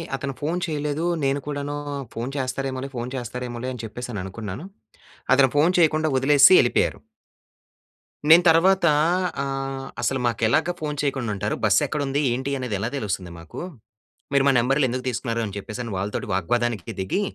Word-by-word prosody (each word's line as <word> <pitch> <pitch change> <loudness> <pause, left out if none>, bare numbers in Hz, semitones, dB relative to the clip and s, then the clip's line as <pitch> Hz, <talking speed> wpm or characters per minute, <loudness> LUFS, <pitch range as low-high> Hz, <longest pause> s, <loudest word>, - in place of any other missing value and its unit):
అతను 135 0 -4
ఫోన్ 165 +5 -1
చేయలేదు. 150 0 -2 0.2
నేను 135 +1 +1
కూడాను 145 0 -3 0.4
ఫోన్ 120 +4 -4
చేస్తారేమోలే! 135 0 -3
ఫోన్ 120 +1 -4
చేస్తారేమోలే! 125 0 -5
అని 120 -2 -8
చెప్పేసి 120 +3 -7
అనుకున్నాను. 100 - -6 0.7
అతను 135 -1 +5
ఫోన్ 160 +5 +4
చేయకుండా 155 -2 +3
వదిలేసిసి 140 +5 +7
ఎళ్ళిపోయారు... 120 - +1 1.3
నేను 165 +3 +8
తర్వాత 185 +3 +4 0.6
ఆహ్, 135 -1 -4 0.2
"అసలు 135 - 0
మాకు 115 - -2
ఎలాగా 160 +9 +2
ఫోన్ 150 -1 -3
చేయకుండా 135 -5 -1
ఉంటారు. 100 - -2
బస్ - - +5
ఎక్కడుంది 145 -1 -1
ఏంటి 130 +3 -2
అనేది 125 -5 -3
ఎలా 110 - -2
తెలుస్తుంది 95 -6 -3
మాకు, 85 - -10 0.7
మీరు 140 -1 +4
మా 140 - +5
నంబర్లు 135 +4 +2
ఎందుకు 125 +2 -4
తీసుకున్నారు," 115 -1 -2
అని 100 -2 -7
చెప్పేసి 115 +4 -6
వాళ్ళతోటి 100 +3 -3
వాగ్వాదానికి 115 +2 -1
దిగి 95 - -1
135 Hz, 150 wpm, -24 LUFS, 120-145 Hz, 1.3 s, నేను